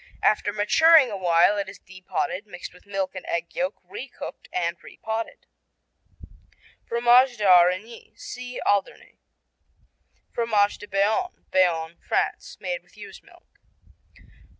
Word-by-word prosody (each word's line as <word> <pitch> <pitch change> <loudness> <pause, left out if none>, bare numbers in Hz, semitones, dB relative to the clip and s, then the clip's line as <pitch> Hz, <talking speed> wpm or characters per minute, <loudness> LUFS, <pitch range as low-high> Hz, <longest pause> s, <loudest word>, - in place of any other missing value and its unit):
After 210 -1 +2
maturing 260 +7 +5
a - - -3
while 180 +2 +3
it 195 -1 -3
is 195 - -11
de 185 0 -15
potted, 190 +2 -3
mixed 180 -3 -9
with 180 +2 -20
milk 195 -2 -2
and 185 - -7
egg 170 0 -3
yolk, 185 +3 -1
re 190 +9 -8
cooked 245 - -10
and 170 -1 -1
re - - -14
potted. 225 +1 -5 1.4
Fromage 240 +2 +4
d'Aurigny 185 +3 +3
see 250 0 -7
Alderney. 200 -1 -1 1.1
Fromage 215 -3 +1
de 205 - -10
Bayonne 210 - 0
Bayonne, 170 -3 +1
France - - -2
Made - - -3
with - - -26
ewe's - - -11
milk. - - -23
205 Hz, 130 wpm, -24 LUFS, 180-235 Hz, 1.4 s, maturing